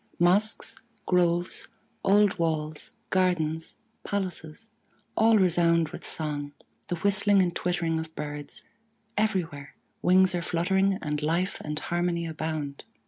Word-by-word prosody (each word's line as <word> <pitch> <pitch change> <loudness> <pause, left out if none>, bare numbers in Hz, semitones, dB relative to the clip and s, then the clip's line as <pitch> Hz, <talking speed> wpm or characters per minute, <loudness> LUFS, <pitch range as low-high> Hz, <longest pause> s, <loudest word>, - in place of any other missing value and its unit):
Mosques, 195 +6 +3 0.3
groves, 175 -1 +1 0.4
old 200 -1 +4
walls, 155 -2 -2 0.2
gardens, 165 -4 0 0.3
palaces 190 0 -4 0.4
all 220 0 +5
resound 170 -3 +3
with - - -9
song, 145 -2 -1 0.3
the 175 - -1
whistling 200 +2 +3
and 180 -2 +2
twittering 170 -2 0
of 160 0 -7
birds; 145 -1 -5 0.5
everywhere 180 -10 -1 0.3
wings 185 +1 +5
are 175 - -1
fluttering 190 +3 +1
and 150 -1 -2
life 170 +5 0
and 150 0 -4
harmony 175 0 -1
abound. 155 -3 -4
175 Hz, 115 wpm, -27 LUFS, 155-190 Hz, 0.5 s, all